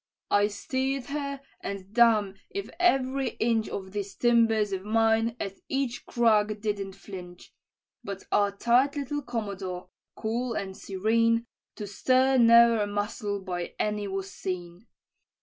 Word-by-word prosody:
"I 205 0 +4
steer'd 265 +5 -3
her 280 -1 -3 0.2
and 200 0 -6
damme 220 -5 +4 0.2
if 400 0 -5
every 270 -6 +2
inch 225 -1 +1
Of 190 -1 -6
these 200 -1 -5
timbers 225 -3 +3
of 190 -1 -3
mine 225 +1 +2
at 195 -1 -5
each 270 -3 -2
crack 215 -3 +2
didn't 205 -2 -3
flinch: 185 -3 -11 0.5
But 200 -3 -6
our 205 -1 +3
tight 240 +7 +2
little 290 +1 -3
commodore, 200 -7 -5 0.3
cool 235 +2 -2
and 190 -1 -4
serene, 230 +5 +1 0.3
To 210 - -5
stir 255 +6 +3
ne'er 235 -1 +7
a 205 - 0
muscle 205 0 -3
by 175 -2 -4
any 210 -1 -1
was 195 0 -4
seen. 180 +2 -6
215 Hz, 135 wpm, -27 LUFS, 200-240 Hz, 0.5 s, ne'er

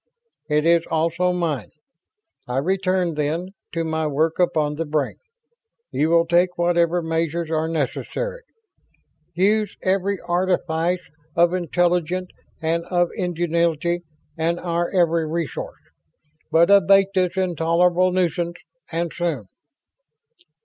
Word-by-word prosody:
"It 150 +1 +2
is 170 0 +5
also 170 +3 +1
mine. 165 - -2 0.8
I 125 +1 -2
return, 185 +2 +1
then, 155 +4 -2 0.2
to 165 0 -1
my 160 -1 -1
work 155 +3 0
upon 155 -4 +2
the 165 +2 -3
Brain. 150 -2 -1 0.7
You 155 - +1
will 170 0 +4
take 175 +1 +2
whatever 170 0 +2
measures 165 0 -1
are 160 0 0
necessary. 165 - -3 0.9
Use 205 +3 +1
every 195 +1 +1
artifice 175 -1 0 0.3
of 170 +1 +4
intellect 180 +1 0 0.3
and 165 +1 0
of 175 -1 +1
ingenuity 170 -1 0 0.4
and 170 +2 0
our 170 0 -1
every 170 -3 +2
resource. 165 0 -4 0.7
But 170 +4 +5
abate 195 0 +6
this 185 -1 0
intolerable 175 0 +2
nuisance, 175 -1 0 0.4
and 170 0 -2
soon." 165 -11 -2
170 Hz, 115 wpm, -22 LUFS, 160-180 Hz, 0.9 s, abate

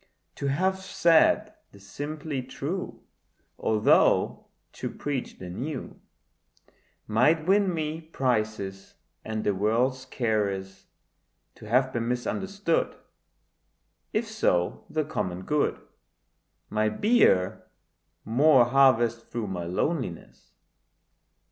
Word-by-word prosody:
To 140 - -2
have 185 +7 +1
said 170 -3 +3 0.2
the 100 - -16
simply 145 +7 -5
true, 150 +8 -5 0.6
Although 110 -1 +3 0.3
to - - -5
preach 140 -3 -4
the 90 - -8
new 130 - -6 1.0
Might 150 +9 +2
win 195 +1 +3
me 160 -1 -3
prizes 110 -10 -2 0.3
and 110 0 -3
the 105 - +1
world's 120 +6 0
caress; 100 -6 -2 0.7
To 110 - -13
have 130 +2 +2
been 115 -1 -2
misunderstood, 195 - -1 1.2
If 220 +1 -1
so 90 - 0
the 155 0 0
common 95 - -3
good 150 +8 0 0.9
Might 110 0 0
bear 210 - +3 0.6
more 130 +3 +5
harvest 120 -3 +3
through 115 -4 -4
my 90 -2 -4
loneliness. 95 - -3
130 Hz, 100 wpm, -27 LUFS, 110-155 Hz, 1.2 s, more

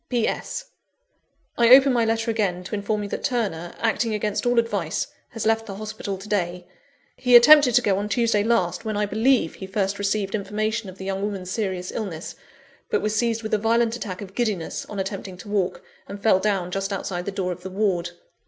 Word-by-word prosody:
"P. 240 -3 +1
S. - - -4 0.9
I 235 -1 +5
open 265 +1 +8
my 240 -1 +3
letter 225 0 0
again, 190 -5 -1
to 185 - -9
inform 210 +1 -1
you 205 - -5
that - - -4
Turner, 195 -9 -2
acting 225 -2 0
against 210 +3 -1
all 245 0 +2
advice, 205 -8 0 0.2
has 225 -2 -5
left 225 0 +1
the 195 - -6
hospital 215 -1 -5
to 195 +3 -11
day. 180 -3 -1 0.5
He 250 -1 +4
attempted 260 0 +8
to - - +5
go 195 -2 +2
on 205 +1 -3
Tuesday 225 -2 +2
last, 215 -7 +1
when, 215 -2 -2
I 210 - +1
believe, 220 -2 +2
he 190 - -8
first 195 0 -1
received 200 0 -1
information 215 +1 -2
of 185 - -12
the 190 - -8
young 195 0 -2
woman's 195 -3 -4
serious 190 -4 -2
illness, 180 -7 -5 0.6
but 440 - 0
was 215 0 0
seized 230 0 0
with 220 - -4
a 215 - +3
violent 230 +1 +2
attack 200 -6 -6
of 195 -1 -11
giddiness, 210 -8 -2
on 205 - -7
attempting 195 -1 -4
to 180 - -11
walk, 195 -3 -1 0.2
and 200 +1 -7
fell 205 -4 +5
down 190 -3 -1
just 195 +1 -2
outside 180 -2 -3
the 200 - -3
door 190 -2 -2
of 180 0 -7
the 190 - -6
ward. 185 -3 0
205 Hz, 210 wpm, -24 LUFS, 190-225 Hz, 0.9 s, open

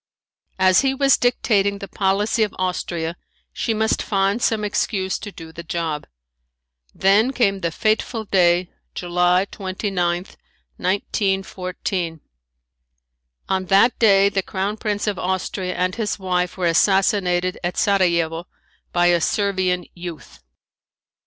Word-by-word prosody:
As 185 -1 +5
he 270 -1 +1
was 275 0 +4
dictating 205 -5 +1
the 200 0 -8
policy 200 +4 0
of 210 -2 0
Austria 175 -2 -2 0.4
she - - -2
must 220 0 +1
find 195 +2 0
some 220 -2 +1
excuse 195 -2 -1
to 205 - -7
do 165 -3 -11
the 165 - -8
job. 165 -2 -3 0.8
Then 205 - +3
came 200 -7 +1
the 170 -2 -1
fateful 220 +4 -1
day, 180 -2 +2 0.2
July 180 +1 +2
29, 185 -2 -2 0.5
1914. 185 -3 -2 1.3
On 190 -1 -1
that 200 +6 +4
day 200 -3 +5
the 195 -1 0
Crown 195 +3 -3
Prince 210 -2 -2
of 205 -3 -2
Austria 185 0 -2
and 185 0 0
his 215 0 -2
wife 180 -2 -1
were 185 - -1
assassinated 185 0 +2
at 175 +1 -2
Sarajevo 170 -4 +1 0.4
by 175 0 +2
a 175 -1 +4
Servian 185 -2 0
youth. 170 - -9
190 Hz, 125 wpm, -21 LUFS, 180-205 Hz, 1.3 s, As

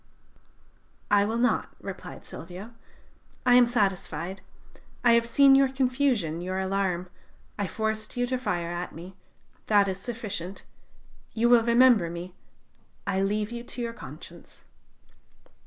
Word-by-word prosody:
"'I 205 0 +5
will 225 +2 -1
not,' 245 +1 0
replied - - -8
Silvio: 190 +6 -9 0.7
'I 245 - +5
am 245 0 +8
satisfied. 190 -5 -1 0.6
I 240 - +6
have 235 0 +4
seen 275 +3 +6
your 270 0 +5
confusion, 255 - 0
your 185 +1 -3
alarm. 190 -2 -1 0.5
I 200 - 0
forced 220 +2 -3
you 245 - +2
to 255 0 -2
fire 175 -8 -2
at 175 +1 -5
me. 180 +3 -10 0.5
That 205 -2 +4
is 190 0 -3
sufficient. 200 -5 -5 0.7
You 235 +1 +3
will 240 -1 +7
remember 235 -6 +5
me. 175 +2 -7 0.7
I 190 - 0
leave 210 +2 -1
you 235 0 -5
to 245 - -6
your 230 -1 -3
conscience.' - - -12
210 Hz, 135 wpm, -27 LUFS, 185-240 Hz, 0.7 s, am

